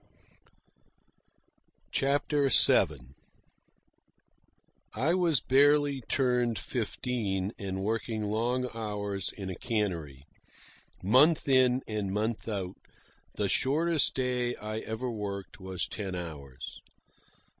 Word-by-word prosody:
CHAPTER 140 +1 +1
VII 65 - +5 1.8
I 140 +10 +1
was 170 - +2
barely 145 +1 +3
turned 125 -4 +2
fifteen, 110 -4 -2
and 95 -2 -4
working 110 +1 -2
long 120 +5 0
hours 105 -4 -3
in 95 -2 -6
a - - -5
cannery. 85 - -3 0.8
Month 140 - +4
in 130 -1 +4
and 105 -3 -2
month 110 +3 -2
out, 95 -4 -4 0.6
the 100 - 0
shortest 155 - +1
day 125 -1 0
I 110 +1 -5
ever 110 +3 -4
worked 100 -3 -6
was 95 -1 -2
ten 95 -4 -5
hours. 75 -7 -7
110 Hz, 95 wpm, -29 LUFS, 100-130 Hz, 1.8 s, VII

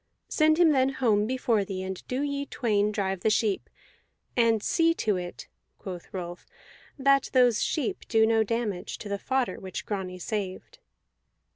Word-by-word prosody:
Send 310 0 +3
him 340 -2 +6
then 265 -2 +3
home 215 -5 +2
before 240 -4 +1
thee, 190 -1 -5
and 190 -1 -5
do 255 +3 -1
ye 280 -1 -2
twain 210 -3 +1
drive 195 -2 -1
the 220 - +2
sheep. 210 -2 0 0.7
And 230 -3 +3
see 330 0 +3
to 215 -9 0
it," 175 -1 -7 0.3
quoth 180 -3 -8
Rolf, 175 -2 -6 0.5
"that 275 0 +3
those 245 -4 +4
sheep 290 -7 -2
do 220 -1 +4
no 225 0 +3
damage 220 -4 -3
to 205 - -8
the 200 0 -2
fodder 265 +1 -1
which 185 -1 -6
Grani 190 -3 -4
saved." 190 -1 -5
220 Hz, 160 wpm, -27 LUFS, 195-260 Hz, 0.7 s, him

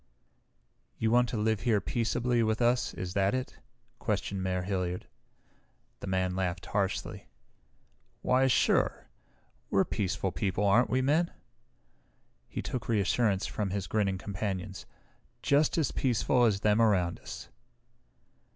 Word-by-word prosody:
"You 110 0 +1
want 120 0 +4
to 115 - -3
live 110 0 +1
here 110 -1 +2
peaceably 120 +5 0
with 110 -1 +1
us, 120 +1 +2
is 90 -1 -5
that 100 +3 +2
it?" 130 0 -5 0.4
questioned 100 -2 -2
Mayor 90 -1 -1
Hilliard. 90 -2 -2 0.9
The - - -7
man 95 -1 0
laughed 90 -1 -2
harshly. 100 -1 -2 1.0
"Why 130 +1 +3
sure! 130 - +2 0.6
We're - - +3
peaceful 95 -1 -1
people, 100 +1 -1
aren't 110 +5 +4
we, 130 +1 +1
Men?" 155 +6 +2 1.2
He - - -5
took 125 -2 -4
reassurance 105 -1 +2
from 105 -2 -2
his 95 0 -2
grinning 100 -3 0
companions. 95 -1 -4 0.6
"Just 145 +3 +3
as 155 -5 +1
peaceful 125 0 +2
as 105 -3 +1
them 105 +1 +3
around 95 -6 +2
us." - - -9
105 Hz, 130 wpm, -30 LUFS, 95-120 Hz, 1.2 s, want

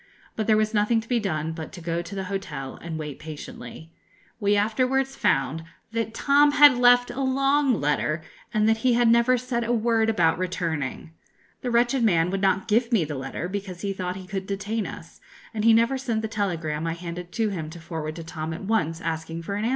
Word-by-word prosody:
But 220 - -2
there 215 -1 +5
was 215 +1 +1
nothing 210 +2 +3
to 225 - -9
be 245 -1 +1
done 160 -6 -2
but 160 -1 -7
to 180 - -8
go 170 0 -2
to 175 +3 -8
the 195 - -3
hotel 185 -9 -5
and 165 -1 -5
wait 150 -3 -6
patiently. 155 -1 -9 0.5
We 205 -1 +2
afterwards 255 +6 +1
found 135 +4 +1 0.3
that 225 -1 -2
Tom 290 +2 +4
had 290 -3 +8
left 245 0 +5
a 255 +3 -4
long 275 -1 +2
letter, 155 +2 0 0.3
and 215 -1 +2
that 225 0 +3
he 245 +2 +2
had 240 0 +3
never 235 +2 +4
said 240 -1 -2
a 230 - -1
word 225 -1 +2
about 170 -7 +2
returning. 165 -5 -3 0.5
The 250 - -2
wretched 240 +2 +2
man 175 -5 +3
would 195 0 -2
not 195 0 +1
give 230 +3 +2
me 220 -8 +3
the 150 - -5
letter, 135 +5 -4
because 190 -2 -5
he 200 -1 -2
thought 185 -1 -4
he 190 -1 -8
could 190 0 -5
detain 205 +2 -2
us, - - -11 0.3
and 215 -1 -2
he 230 - +6
never 230 +4 +3
sent 230 -4 -2
the - - -1
telegram 165 -7 -2
I 165 - -1
handed 175 +1 -7
to 225 -2 +1
him 165 -6 -4
to 170 +2 -10
forward 160 -2 -5
to 165 - -7
Tom 160 -1 -5
at - - -8
once, 170 -6 0
asking 165 0 -4
for 200 - -4
an 205 +2 -2
answer. - - +1
200 Hz, 220 wpm, -25 LUFS, 165-230 Hz, 0.5 s, had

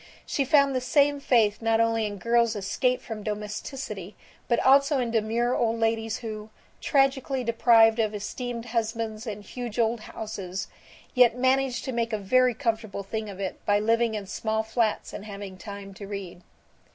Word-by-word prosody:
She 275 - 0
found 280 0 +4
the 255 - 0
same 285 +2 +3
faith 225 -6 +2
not 225 0 +2
only 225 -1 +2
in 205 -1 -6
girls 230 +3 +2
escaped 250 +5 0
from 220 -3 -6
domesticity 210 -1 -5 0.3
but 235 - +2
also 275 +2 +5
in 245 -3 -1
demure 230 +2 +1
old 230 -1 0
ladies 225 0 0
who, 215 -1 -6 0.3
tragically 270 -2 +1
deprived 230 -1 +5
of 215 -1 +1
esteemed 235 +3 -5
husbands 225 -1 -3
and 210 -1 -5
huge 240 0 -6
old 230 0 +1
houses, 195 -3 -6 0.5
yet 245 -2 +5
managed 260 -1 +1
to 260 - -2
make 230 -1 -1
a - - +1
very 250 +5 +3
comfortable 220 -3 -2
thing 215 +2 -4
of 195 -1 -9
it 190 -2 -5
by 205 0 +3
living 230 +1 +2
in 205 -2 -4
small 220 +2 -2
flats 220 0 -1
and 205 - -7
having 200 -2 -7
time 200 0 -9
to 200 +1 -9
read. 195 -3 -7
225 Hz, 170 wpm, -26 LUFS, 210-245 Hz, 0.5 s, also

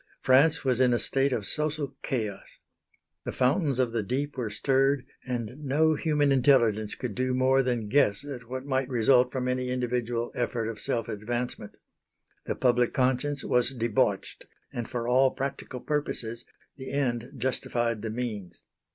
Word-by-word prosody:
France 145 +5 +4
was 130 -2 +2
in 125 -2 +4
a - - +2
state 135 +1 +1
of 110 -5 -1
social 150 -1 -2
chaos. 110 -6 -4 0.7
The - - -3
fountains 140 +1 +1
of 125 -3 +1
the 115 -1 0
deep 135 +8 -2
were 120 -5 -2
stirred, 135 +4 +1 0.2
and 125 +1 -4
no 150 +2 +2
human 150 -2 +1
intelligence 120 -6 +3
could 125 -5 -4
do 130 +4 0
more 130 +1 +4
than 120 -4 -1
guess 110 -1 +2
at 125 -5 -8
what 130 +1 -5
might 130 -1 0
result 125 +1 +4
from 130 -1 -2
any 125 0 -1
individual 120 -1 -1
effort 120 -2 -2
of 110 -2 -6
self 115 - -1
advancement. 115 0 -4 0.7
The - - -1
public 125 -1 +2
conscience 130 +2 +1
was 125 +1 +1
debauched, 115 -2 0 0.3
and 120 -2 -4
for 120 -2 -3
all 130 +2 +5
practical 135 -1 -4
purposes 120 -5 -3 0.3
the 130 -1 -7
end 125 -2 -1
justified 120 -2 -1
the 110 - -3
means. 105 -6 -5
125 Hz, 160 wpm, -27 LUFS, 120-135 Hz, 0.7 s, all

